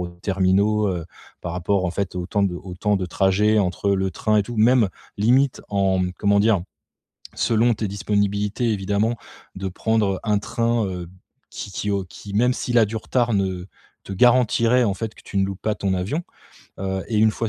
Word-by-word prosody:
aux 90 - -3
terminaux, 95 +4 +1
heu, 90 -4 -3 0.4
par 85 - -4
rapport 90 +2 0
en 90 - 0
fait 95 +1 -3
aux 90 - -2
temps 100 +2 0
de 95 -3 +1
aux 90 0 -9
temps 105 +3 +1
de 95 - -2
trajet 100 +4 +2
entre 100 +1 0
le 95 -1 +1
train, 105 +5 +1
et 105 - +3
tout. 120 +3 -7
Même, 115 0 +4 0.3
limite 125 +5 +3
en, 95 -2 +1
mmh 90 0 -1
comment 100 0 +3
dire? 105 -4 +3 0.7
Selon 115 +1 +2
tes 105 -1 -3
disponibilités, 100 +3 0
évidemment, 105 +3 0 0.4
de 95 0 -4
prendre 100 0 0
un 105 -2 +1
train, 115 0 0
heu, 90 -2 -6 0.4
qui 100 - -7
qui 105 - -2
au 100 -2 -1
qui, 100 +3 -11
même 125 +4 +3
s'il 120 -1 -1
a 115 - +6
du 110 +2 -6
retard, 120 +1 0
ne 95 -2 -1 0.4
te 100 - -5
garantirait, 120 +2 +4
en 100 - +1
fait 110 +3 -5
que - - -16
tu - - -11
ne 95 - +3
loupes 95 -1 -6
pas 110 -1 -1
ton 100 -2 -1
avion, 100 - -2 0.6
heu, 95 0 -2
et 110 - -1
une 110 +1 +5
fois 115 +1 -3
100 Hz, 205 wpm, -22 LUFS, 95-110 Hz, 0.7 s, a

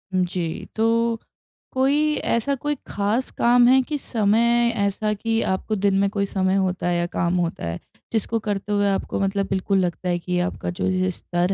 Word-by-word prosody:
जी, 180 -2 -1
तो 230 +1 +2 0.5
कोई 290 +3 +2
ऐसा 235 +5 0
कोई 295 +3 -2
खास 210 +6 -1
काम 240 0 +5
है 260 +1 +6
कि 300 -1 -1
समय 235 0 +2
ऐसा 205 +1 0
कि 225 +2 -1
आपको 190 +3 -1
दिन 195 -1 +2
में 200 0 +2
कोई 200 -1 -1
समय 190 -1 0
होता 185 -2 0
है 175 -1 +1
या 170 - +1
काम 170 +1 0
होता 170 - -2
है, 85 +1 -4 0.3
जिसको 225 +1 0
करते 205 -1 -3
हुए 205 0 +2
आपको 195 - -1
मतलब 195 0 0
बिल्कुल 195 +1 0
लगता 180 0 -1
है 175 - 0
कि 180 +1 -2
आपका 180 0 -2
जो 175 - -2
ये 185 0 +1
स्तर 175 +2 -1
200 Hz, 185 wpm, -23 LUFS, 185-230 Hz, 0.5 s, है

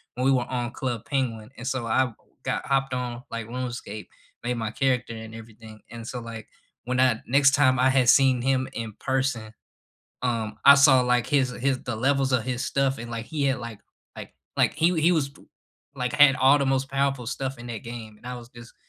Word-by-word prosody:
when 125 - -1
we 135 - +5
were 125 -2 +2
on 120 -1 -2
Club 120 -4 -4
Penguin 120 -6 -2
and 120 - -8
so 130 -2 -2
I 130 +2 +2 0.3
got - - -2
hopped 135 -1 0
on, 125 -1 -4
like, 115 -1 -5
RuneScape, 120 -3 -6 0.4
made 125 0 -1
my 110 -2 -3
character 125 -2 0
and 110 0 -9
everything, 110 -1 -12
and 115 -1 -8
so, 125 - -5
like, 115 -1 -8 0.4
when 125 +1 -1
I 125 -3 +3
next 135 +1 +5
time 130 -3 +3
I 130 +1 +4
had 130 -2 +3
seen 130 -2 +5
him 130 0 +1
in 115 -2 -5
person, 130 -5 -2 0.7
um, 115 -3 -2
I 140 0 +9
saw, 140 -2 +6
like, 125 -1 +1
his 135 -3 +2
his 130 +1 -1
the 120 - -3
levels 135 +2 +1
of 120 - +2
his 125 +1 -3
stuff 135 -1 0
and, 120 0 -7
like, 115 0 -5
he 150 +3 -3
had, 135 -1 +1
like 115 -3 -8 0.4
like - - -9 0.2
like - - +3
he 165 - +3
he 170 +3 +4
was 155 -5 +1
t - - -18 0.5
like, 125 0 -2
had 145 -2 +6
all 135 +2 +5
the 140 - +1
most 135 0 0
powerful 135 -3 -1
stuff 135 0 -4
in 120 - -9
that 115 -3 -6
game 115 -2 -8
and 120 - -19
I 125 - -5
was 120 -1 -11
just 120 -1 -14
125 Hz, 215 wpm, -25 LUFS, 115-135 Hz, 0.7 s, I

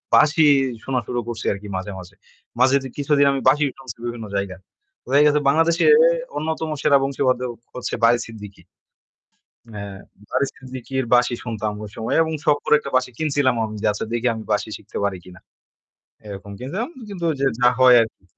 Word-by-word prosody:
বাঁশি 155 +1 +5 0.4
শোনা 130 -1 -1
শুরু 120 - -2
করছি 115 -1 -5
আরকি 100 +1 -9
মাঝে, 100 +2 -5
মাঝে। 90 +1 -13 0.4
মাঝে 130 +2 +5
তো - - -5
কিছুদিন 145 0 +2
আমি 135 - -1
বাঁশিই 145 +1 +3
শুনছি 130 -5 -9
বিভিন্ন 120 -2 -5
জায়গার। 100 -1 -3 0.5
ওয়ে 140 +2 +5
গেছে 150 0 +4
বাংলাদেশে 165 +3 +2 0.5
অন্যতম 160 0 -3
সেরা 140 - +5
বংশীবাদক 130 -2 0 0.2
হচ্ছে 125 - -5
বারী 120 +1 +6
সিদ্দিকী। 105 -3 -11 1.1
হ্যাঁ, 100 -1 -7 0.3
বারী 140 - +1
সিদ্দিকীর 130 -1 -5
বাঁশি 120 0 +4
শুনতাম 110 -3 -3
ওই 105 - -7
সময় 110 - -2
এবং 160 - -4
সখ 150 -2 +4
করে - - +5
একটা 140 - -8
বাঁশি 130 0 +1
কিনছিলাম 145 -4 +1
আমি 110 0 -7
যে - - +2
আচ্ছা 105 - -4
দেখি 120 +1 0
আমি 110 - -7
বাঁশি 105 - 0
শিখতে - - -10
পারি 100 -2 -1
কিনা, 90 0 -13 0.9
এরকম 100 0 -8
কিনছিলাম। 185 - -4 0.2
কিন্তু 190 -4 -6
ঐযে 135 -2 -1
যা 125 - +6
হয় 130 -1 +8
আরকি। 110 -4 -8
125 Hz, 175 wpm, -21 LUFS, 110-140 Hz, 1.1 s, হয়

